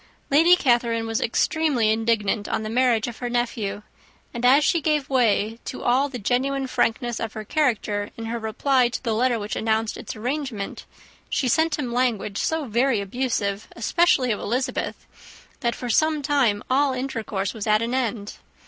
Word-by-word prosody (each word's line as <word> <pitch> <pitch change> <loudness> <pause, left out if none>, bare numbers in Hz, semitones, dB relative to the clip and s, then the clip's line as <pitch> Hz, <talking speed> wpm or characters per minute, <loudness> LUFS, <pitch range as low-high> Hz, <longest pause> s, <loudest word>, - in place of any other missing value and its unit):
Lady 330 +5 +6
Catherine 235 -6 +1
was 225 0 -2
extremely 255 -2 +1
indignant 220 -2 0
on - - -1
the 215 - -4
marriage 240 -2 +2
of 235 - -7
her 245 - -3
nephew; 225 -4 -2 0.5
and 235 -1 -5
as 270 +4 +6
she 335 - +2
gave 300 -3 0
way 225 -3 +2
to - - -6
all 265 +4 +2
the 260 - -6
genuine 265 +5 0
frankness 240 -1 -1
of 225 -2 -4
her 215 - -6
character, 215 -6 0
in 230 - -6
her 230 +1 -3
reply 240 +3 +1
to 245 - -5
the 230 -3 0
letter 240 +2 +2
which 210 -1 -4
announced 220 0 0
its - - -7
arrangement, 245 -3 -4 0.4
she 260 - 0
sent 320 +4 +2
him 255 -5 -3
language 235 -5 0
so 320 -2 -1
very 240 0 +1
abusive, 205 -1 -2
especially 260 0 +2
of 210 - -1
Elizabeth, 250 +5 -3 0.5
that 235 -2 -1
for 245 - -6
some 310 +2 +2
time 260 -8 +2
all 270 +1 +2
intercourse 225 -7 -3
was 220 -2 -5
at 215 +1 +3
an 235 +2 -2
end. 230 -5 -2
240 Hz, 175 wpm, -23 LUFS, 220-265 Hz, 0.5 s, Lady